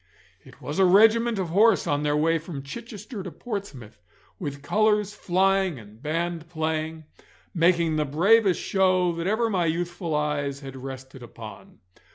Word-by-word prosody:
It - - -17
was 150 +5 -5
a - - +6
regiment 225 +4 +5
of 185 -3 -2
horse 210 +4 +4
on 145 0 0
their 150 0 +1
way 165 +2 +2
from 155 -4 -7
Chichester 215 - -8
to 185 - -6
Portsmouth, 185 - -7 0.4
with 140 -4 -6
colours 210 +3 +2
flying 190 -3 +1
and 105 0 -14
band 165 +2 -3
playing, 160 -1 -3 0.5
making 170 -2 +2
the 150 - +1
bravest 190 +7 +3
show 185 -2 +2
that 170 +1 -4
ever 220 +3 +1
my 185 -6 0
youthful 170 0 -2
eyes 145 -2 -1
had 135 -1 -9
rested 130 0 -9
upon. 115 -2 -12
170 Hz, 155 wpm, -25 LUFS, 150-195 Hz, 0.5 s, a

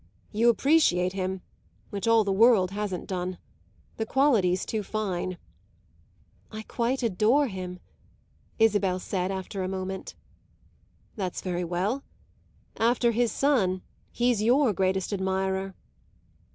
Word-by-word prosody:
"You 230 +3 +3
appreciate 235 - +3
him, 190 -1 -3 0.5
which 200 +2 -3
all 230 -1 +5
the 200 - -1
world 205 -3 +5
hasn't 200 -3 -3
done. 180 -1 -3 0.6
The 220 - -1
quality's 215 -11 +2
too 220 - -2
fine." 185 -4 -3 1.1
"I 215 0 -6
quite 245 +4 -1
adore 230 +7 +3
him," 185 -5 -6 0.8
Isabel 205 -4 +2
after 190 +1 -2
a 185 - -1
moment 190 0 -4
said. - - -14 1.0
"That's 185 -3 -3
very 180 -1 -2
well. 185 +10 -1 0.8
After 235 +1 +3
his 235 0 +1
son 195 -11 +1 0.3
he's 240 -3 +1
your 245 +1 +3
greatest 190 +1 0
admirer." 190 0 -1
195 Hz, 115 wpm, -27 LUFS, 185-230 Hz, 1.1 s, all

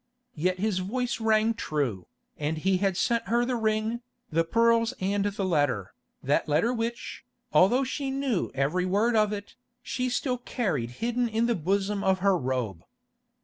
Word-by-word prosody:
Yet 180 +4 0
his 200 -1 0
voice 240 +6 -2
rang 220 0 +3
true, 140 - -2 0.3
and 155 +1 -2
he 190 +4 +2
had 195 -1 0
sent 235 +3 +1
her 240 +1 +2
the 250 0 -1
ring, 220 +1 0 0.3
the 165 +1 +2
pearls 230 +5 +2
and 200 +2 0
the 200 -1 -1
letter, 145 - 0 0.3
that 140 +3 +1
letter 165 +12 +2
which, 235 0 -4 0.3
although 245 +9 +5
she 275 +1 -3
knew 270 -7 -1
every 155 +7 +1
word 215 +5 +2
of 215 -1 +3
it, 205 -1 -6 0.3
she 255 0 -2
still 250 0 -1
carried 180 - -2 0.2
hidden 240 0 0
in 225 +1 +1
the 235 - +2
bosom 195 +3 0
of 190 0 +3
her 195 +1 +3
robe. 125 - -2
205 Hz, 165 wpm, -27 LUFS, 165-230 Hz, 0.3 s, although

